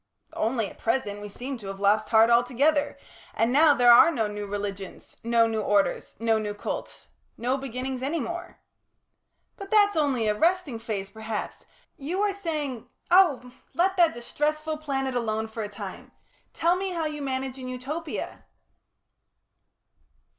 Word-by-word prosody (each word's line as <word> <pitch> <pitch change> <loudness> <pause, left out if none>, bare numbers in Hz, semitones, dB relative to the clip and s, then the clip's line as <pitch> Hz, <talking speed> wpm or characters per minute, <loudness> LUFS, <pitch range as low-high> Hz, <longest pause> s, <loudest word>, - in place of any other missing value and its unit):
"Only 225 -1 0
at - - -13
present 225 -4 -1
we 205 - -7
seem 250 +5 -6
to 200 - -9
have 195 0 -6
lost 200 +2 +2
heart 225 +1 +5
altogether, 275 +5 +2 0.4
and 230 +2 +1
now 295 +1 +6
there 245 -2 +6
are 240 +7 +8
no 235 -10 0
new 210 0 -5
religions, 200 -1 -6
no 230 0 +4
new 220 -1 -1
orders, 205 -1 0
no 225 -1 +1
new 210 -1 -4
cults - - -6 0.3
no 250 +3 0
beginnings 260 -1 -4
any 295 +5 -1
more." 345 +6 -6 1.0
"But 395 0 -8
that's 410 -2 +4
only 280 -7 +1
a 210 - +3
resting 320 - +1
phase, 200 -4 -4
perhaps. 220 0 -6 0.3
You 320 +7 -3
were 410 -1 +2
saying 305 - -4
" - - -34
"Oh! 310 -9 +4 0.2
let 375 +3 +2
that 340 -2 +4
distressful 305 +5 -2
planet 270 -3 -2
alone 220 -2 -1
for 220 +1 -6
a 210 - -4
time! 205 - -9 0.4
Tell 340 +2 +2
me 385 +1 -2
how 335 -3 -2
you 300 -1 -4
manage 265 -1 -3
in 255 - -7
Utopia." 285 +6 -5
255 Hz, 160 wpm, -26 LUFS, 220-310 Hz, 1.0 s, are